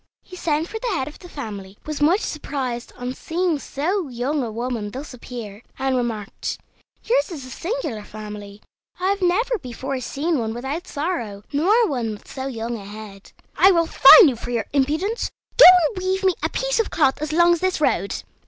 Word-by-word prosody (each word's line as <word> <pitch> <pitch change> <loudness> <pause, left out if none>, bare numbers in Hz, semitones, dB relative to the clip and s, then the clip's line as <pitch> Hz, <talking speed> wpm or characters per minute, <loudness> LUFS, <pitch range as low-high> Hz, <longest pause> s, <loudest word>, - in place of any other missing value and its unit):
He 365 - -12
sent 320 -2 -1
for 445 +3 -6
the 455 -4 -2
head 265 -4 -2
of 300 - -10
the 355 - -12
family, 205 - -7
was 305 -1 -5
much 345 +8 +4
surprised 260 -5 -4
on 250 +1 -4
seeing 335 +1 -1
so 335 +7 -2
young 260 +5 -1
a 235 -3 -3
woman 230 -2 -3
thus 265 +6 -8
appear, 230 -4 -8 0.2
and 265 -1 0
remarked: 230 -4 -3 0.5
"Yours - - +1
is 300 -7 -7
a 255 - -10
singular 335 - -4
family. 210 -1 -9 0.4
I 370 +1 +1
have 400 0 0
never 425 +7 +1
before 260 +2 -5
seen 300 +4 -1
one 225 -1 -3
without 280 +9 -4
sorrow, 240 - -3
nor 415 +11 +3
one 240 -7 -2
with 210 - -12
so 265 0 -5
young 235 -2 -4
a 200 - -10
head. 205 -1 -11 0.2
I 380 - +6
will 335 -3 +3
fine 365 +4 +9
you 265 - +1
for 235 - -8
your 235 -2 -1
impudence. 310 - 0 0.3
Go - - +12 0.2
and 380 - -6
weave 380 +1 0
me 375 -1 +4
a - - 0
piece - - -1
of 455 - +1
cloth 280 -3 +1
as 305 0 -2
long 345 +2 +5
as 345 - -1
this 370 -1 0
road." 200 - 0
280 Hz, 200 wpm, -22 LUFS, 235-355 Hz, 0.5 s, Go